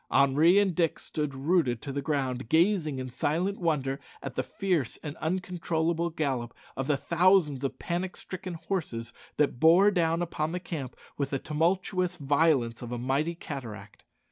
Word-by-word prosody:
Henri 150 +7 +5
and 200 -3 +3
Dick 165 -1 +1
stood 150 -3 -3
rooted 135 -4 +1
to 140 - -6
the 140 +1 -2
ground, 130 -5 -2
gazing 165 -4 +3
in 130 0 -4
silent 165 +10 -1
wonder 145 -6 0 0.2
at 135 - -5
the 130 - 0
fierce 170 - -1
and 150 -1 -5
uncontrollable 170 -1 -1
gallop 135 -7 -2 0.2
of 135 0 -3
the 145 -2 +2
thousands 170 -3 +3
of 135 - -2
panic 180 +2 -3
stricken 185 -1 -6
horses 160 -10 -4 0.2
that 145 -5 +1
bore 175 +6 +6
down 170 -2 +1
upon 160 -1 -2
the 180 - -1
camp 145 -8 -6 0.2
with 140 -1 0
the 140 - -1
tumultuous 180 +4 0
violence 140 -5 +2
of 120 -1 -6
a 120 - -2
mighty 135 +7 0
cataract. 115 - -8
155 Hz, 165 wpm, -28 LUFS, 135-175 Hz, 0.2 s, bore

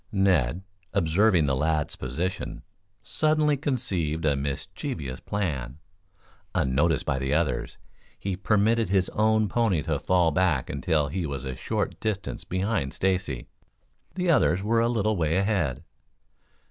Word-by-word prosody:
Ned, 95 - +2 0.3
observing 90 -1 +3
the 70 -1 +1
lad's 75 +2 0
position, 80 +10 -4 0.4
suddenly 155 +3 +2
conceived 95 - -1
a 75 -2 +3
mischievous 70 -1 -4
plan. 70 -11 -3 0.8
Unnoticed 70 +6 +2
by 70 -3 0
the 65 +2 0
others, 75 -7 -1 0.4
he 95 -2 -3
permitted 105 +4 +2
his 95 -1 +2
own 110 0 +2
pony 100 -8 +1
to - - -1
fall 90 -3 +3
back 80 -5 +1
until 70 +1 0
he 85 +1 -2
was 70 -2 -5
a 65 -1 -4
short - - -2
distance 105 -3 -3
behind 95 -6 -1
Stacy. 90 -10 -1 0.7
The 180 -2 +2
others 95 - +3
were 115 +2 +2
a 115 - +2
little 110 -2 +1
way 80 +1 +1
ahead. 95 - 0
90 Hz, 135 wpm, -26 LUFS, 70-105 Hz, 0.8 s, observing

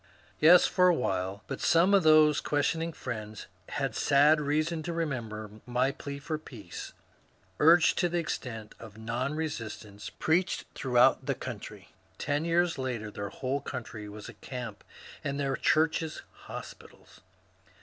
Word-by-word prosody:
Yes, 170 +3 +8
for 180 0 +4
a 180 - +5
while; 95 - -2
but - - -6
some 175 +4 +4
of 200 - +6
these 155 -2 +6
questioning 160 +3 0
friends 110 -7 -6 0.2
had - - -2
sad 150 +2 +4
reason 155 +3 0
to 170 +2 -4
remember 110 -10 -4
my 125 +2 +1
plea 140 0 -7
for 150 +2 -4
peace, 110 - -9 0.7
urged 165 +2 +5
to 175 - +2
the 175 - -1
extent 120 -9 -4
of 110 -2 -11
non 120 +6 -2
resistance, 115 -9 -5
preached 175 +4 0
throughout 125 -2 +3
the - - +1
county. - - -8 0.3
Ten 145 +2 -1
years 170 -2 +1
later 120 -5 -3
their 100 -1 -5
whole 135 +2 -3
county 110 -5 -6
was 105 0 -9
a - - -9
camp 120 -5 -7 0.4
and 140 0 -2
their 135 -1 0
churches 160 +2 +1 0.2
hospitals. - - -11
140 Hz, 145 wpm, -29 LUFS, 115-160 Hz, 0.7 s, Yes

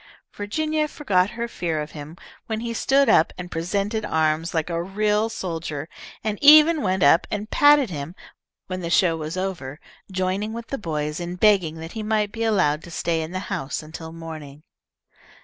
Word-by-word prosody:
Virginia 305 +9 -1
forgot 200 -12 +1
her 235 +1 -4
fear 170 -8 -3
of 150 0 -5
him 150 +1 -9 0.3
when 220 -1 -3
he 235 0 -3
stood 275 +4 +3
up 160 - +4
and 180 0 -7
presented 200 +6 -2
arms 160 -2 0
like 160 -2 -1
a 170 -1 -2
real 210 +4 0
soldier, 165 -8 -4 0.4
and 210 -1 -2
even 305 +2 +8
went 185 -4 0
up 150 +4 +5
and 210 +1 -4
patted 290 -6 +5
him 150 +2 -6 0.5
when 185 0 -5
the 170 - -4
show 170 -1 +3
was 160 +2 -5
over, 165 -7 -4 0.3
joining 190 +3 -1
with 235 0 -6
the 275 - -2
boys 150 -4 -3
in 175 +1 -4
begging 185 -5 +3
that 165 +1 -8
he 220 - -5
might 215 -1 0
be 225 +1 -4
allowed 185 -9 +2
to 170 - -12
stay 165 0 -1
in 160 +1 -5
the 185 0 -3
house 135 +3 -3
until 160 +1 -9
morning. 155 -3 -9
185 Hz, 185 wpm, -23 LUFS, 160-215 Hz, 0.5 s, even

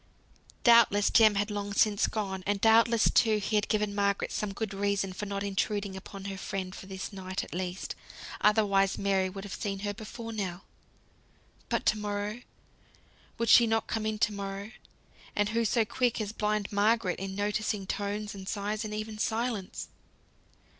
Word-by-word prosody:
Doubtless 230 -4 +6
Jem 215 -3 +6
had 205 +1 0
long 205 -1 -3
since 205 0 +3
gone; 190 -4 -3
and 205 0 +1
doubtless, 225 +1 +5
too, 220 -2 +4
he 210 +1 -2
had 205 0 +2
given 210 -2 0
Margaret 200 -1 0
some 210 -2 -2
good 200 0 -4
reason 195 -1 0
for 210 +3 -5
not 200 0 -3
intruding 200 0 -1
upon 195 +1 -9
her 195 -1 -5
friend 190 -2 -4
for 190 - -9
this 190 +2 -6
night 185 -1 -4
at - - -10
least, 180 +1 -3 0.5
otherwise 200 -2 +3
Mary 195 -1 +1
would 195 +1 -7
have 205 - -7
seen 195 -2 -3
her 205 0 -2
before 225 +2 -7
now. 190 -4 -4 1.1
But - - 0
to 215 - +3
morrow, 205 +2 -3 1.0
would 230 -1 0
she 235 0 +8
not 225 0 +1
come 220 -2 -2
in 215 0 -1
to 210 0 +1
morrow? 200 +1 -5 0.6
And 205 0 +2
who 230 +1 +1
so 230 +1 +2
quick 245 +2 0
as 210 -2 -2
blind 210 -1 -1
Margaret 205 -1 +2
in 190 0 -4
noticing 205 0 -1
tones, 205 +2 -3
and 195 -1 -7
sighs, 210 +1 -2
and 210 -1 -4
even 215 0 -5
silence? 220 -3 -2
205 Hz, 175 wpm, -29 LUFS, 195-215 Hz, 1.1 s, she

